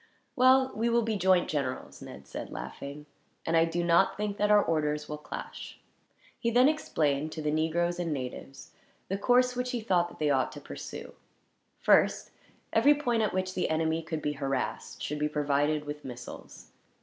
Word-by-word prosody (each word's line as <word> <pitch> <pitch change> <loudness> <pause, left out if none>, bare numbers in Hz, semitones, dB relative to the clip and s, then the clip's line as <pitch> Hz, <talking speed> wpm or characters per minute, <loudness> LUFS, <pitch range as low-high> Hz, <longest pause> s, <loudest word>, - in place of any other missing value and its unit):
"Well, 260 0 +5
we 230 +2 +1
will 235 0 +3
be 220 -1 -1
joint 185 -2 +3
generals," 140 -4 -3
Ned - - -10
said, - - -7
laughing; 140 - -7 0.4
"and 165 - +1
I 165 0 +5
do 170 +1 -2
not 170 +3 +3
think 205 -1 -2
that 210 0 +1
our 210 -1 +6
orders 150 -2 -1
will 150 0 -5
clash." - - -8 0.6
He 235 - 0
then 245 +3 +5
explained, 155 - 0
to 160 - -5
the 150 - 0
negroes 170 +3 0
and 170 -2 -1
natives, 135 0 -6 0.4
the 195 - -1
course 250 +3 +3
which 250 0 -2
he 245 - -1
thought 180 -6 +1
that - - -14
they 150 -1 +1
ought 130 -2 +1
to - - -8
pursue. - - -8 0.6
First, - - +3 0.4
every 295 +1 +6
point 240 -6 0
at 215 - +1
which 185 0 -2
the 185 - -1
enemy 160 +1 0
could 160 -1 -5
be 150 - 0
harassed 135 -2 -3
should 150 0 -3
be 150 0 0
provided 150 0 0
with 150 0 -6
missiles. 125 -2 -10
165 Hz, 185 wpm, -29 LUFS, 150-210 Hz, 0.6 s, our